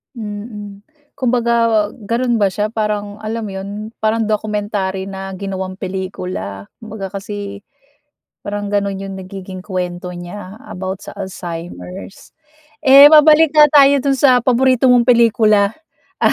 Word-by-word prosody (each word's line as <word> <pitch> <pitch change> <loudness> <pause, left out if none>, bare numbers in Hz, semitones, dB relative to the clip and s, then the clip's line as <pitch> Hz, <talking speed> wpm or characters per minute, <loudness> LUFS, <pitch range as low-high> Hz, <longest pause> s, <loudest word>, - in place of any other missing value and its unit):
Mm. 210 -2 -7 0.4
Kumbaga 235 -4 +1 0.2
ganun 235 +2 0
ba 200 - +3
siya 205 +3 -2
parang, 210 -2 -3
alam 220 +2 -4
mo 205 - -6
yun, 195 +1 -6 0.3
parang 220 +1 +1
documentary 205 -2 -2
na 195 0 -7
ginawang 190 -1 -5
pelikula? 185 - -6
Kumbaga 215 -3 -7
kasi, 200 0 -7 0.8
parang 205 0 -4
ganun 200 -1 -1
yung 195 0 -6
nagiging 185 0 -9
kuwento 180 -2 -4
niya 185 +3 -9
about 190 +1 -6
sa - - -9
Alzheimer's. 180 0 -8 0.5
Eh 275 +2 +10
mabalik 310 0 +7
nga 300 -1 +8
tayo 280 -1 +7
dun 275 - +2
sa 255 -2 +5
paborito 255 0 +3
mong 245 -1 +5
pelikula, 220 -3 +4 0.5
ah, - - +4
205 Hz, 130 wpm, -17 LUFS, 190-230 Hz, 0.8 s, Eh